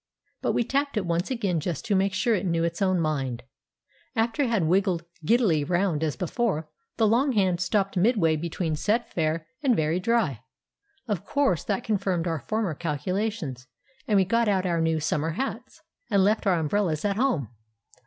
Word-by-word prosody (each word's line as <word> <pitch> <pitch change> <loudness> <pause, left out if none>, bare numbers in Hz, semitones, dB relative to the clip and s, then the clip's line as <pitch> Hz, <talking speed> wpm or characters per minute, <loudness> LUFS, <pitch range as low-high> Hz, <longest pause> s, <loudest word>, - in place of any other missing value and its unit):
But - - 0
we - - +2
tapped 280 +1 -1
it 200 - 0
once 170 +1 -1
again, 205 -10 0
just 175 +7 -4
to 220 - 0
make 190 0 +1
sure 230 +4 +2
it 205 - 0
knew 165 -1 +1
its 170 +3 -2
own 185 -2 +2
mind. 135 -6 -2 0.7
After 225 +4 +1
it 265 - +2
had 225 -6 +1
wiggled 175 0 +1 0.2
giddily 185 - +3
round 175 -1 0
as 155 -3 -1
before, 180 -3 -1 0.3
the 225 - +3
long 250 +6 +3
hand 185 -5 +2
stopped 195 +1 0
midway 185 -5 +3
between 165 0 -2
"Set 215 +9 -1
Fair" 160 -1 0 0.2
and 265 -5 +3
"Very 160 +1 +1
Dry." 190 - +1 0.7
Of 205 -6 -2
course 275 - +1
that 200 -2 -1
confirmed 190 -5 0
our 165 -2 -1
former 215 0 -2
calculations, 165 - -3 0.4
and 210 -4 +3
we 190 - +4
got 230 +4 +2
out 190 -2 +1
our 170 -2 +1
new 160 -1 +1
summer 155 +1 -1
hats, 260 - -5 0.3
and 200 -4 +3
left 210 +1 +2
our 185 -2 +4
umbrellas 160 +1 0
at 200 -1 +1
home. 200 - +1
185 Hz, 185 wpm, -26 LUFS, 165-220 Hz, 0.7 s, we